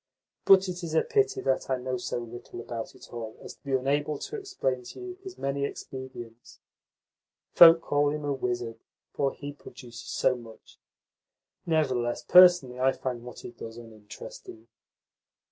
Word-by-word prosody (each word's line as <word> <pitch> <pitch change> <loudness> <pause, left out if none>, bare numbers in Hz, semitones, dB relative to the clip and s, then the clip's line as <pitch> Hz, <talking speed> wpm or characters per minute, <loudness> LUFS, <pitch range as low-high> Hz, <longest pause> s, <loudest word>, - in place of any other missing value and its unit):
But 195 0 +7
it 180 0 -5
is 160 -1 -4
a - - +4
pity 415 -3 +1
that 135 0 0
I 130 - +1
know 125 0 -3
so 120 - -3
little 120 0 -8
about 115 -1 -6
it - - -15
all 115 -2 -6
as - - -8
to - - -29
be 140 -2 -4
unable 145 +3 0
to 445 - -6
explain 385 - -2
to - - -10
you 370 0 -8
his 380 -1 -9
many 140 0 -2
expedients. 130 -4 -8 1.0
Folk 165 -1 +9
call 145 -2 +1
him 150 0 -3
a 145 - 0
wizard, 120 -3 -3 0.3
for 135 -1 0
he 145 +1 -8
produces 125 -4 -11
so 130 - +2
much. 115 -2 -14 0.9
Nevertheless, 130 -7 0
personally 175 -9 +6
I 130 +1 +3
find 125 -3 -4
what 125 +1 -10
he - - -8
does 115 -1 -9
uninteresting." 110 0 -11
130 Hz, 160 wpm, -28 LUFS, 120-155 Hz, 1.0 s, Folk